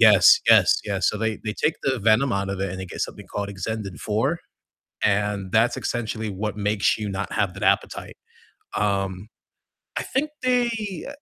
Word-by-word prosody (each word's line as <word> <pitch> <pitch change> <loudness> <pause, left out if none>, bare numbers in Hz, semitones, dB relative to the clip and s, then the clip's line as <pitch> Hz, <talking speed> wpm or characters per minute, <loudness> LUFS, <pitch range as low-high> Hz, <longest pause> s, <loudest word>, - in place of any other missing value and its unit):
Yes, - - +8
yes, - - +6
yes, - - 0
so 105 - -1
they 110 0 -1
they 105 - -1
take 155 +8 0
the 130 -2 0
venom 115 +5 +3
out 100 0 -1
of 100 -1 -4
it 95 - -1
and 95 - -6
they 95 - -5
get - - -8
something 105 -2 -4
called 100 0 -4
Exendin-4, 105 - -2 0.7
and 100 -2 0
that's 115 +2 +3
essentially 110 -2 -3
what 105 +1 -3
makes 105 0 +1
you 105 -1 -3
not 100 +1 -4
have 95 -3 0
that 95 - -9
appetite. - - 0 0.6
Um, 100 -1 -1 0.7
I - - -1
think 290 +4 -1
they 235 -7 0
105 Hz, 170 wpm, -24 LUFS, 100-115 Hz, 0.7 s, Yes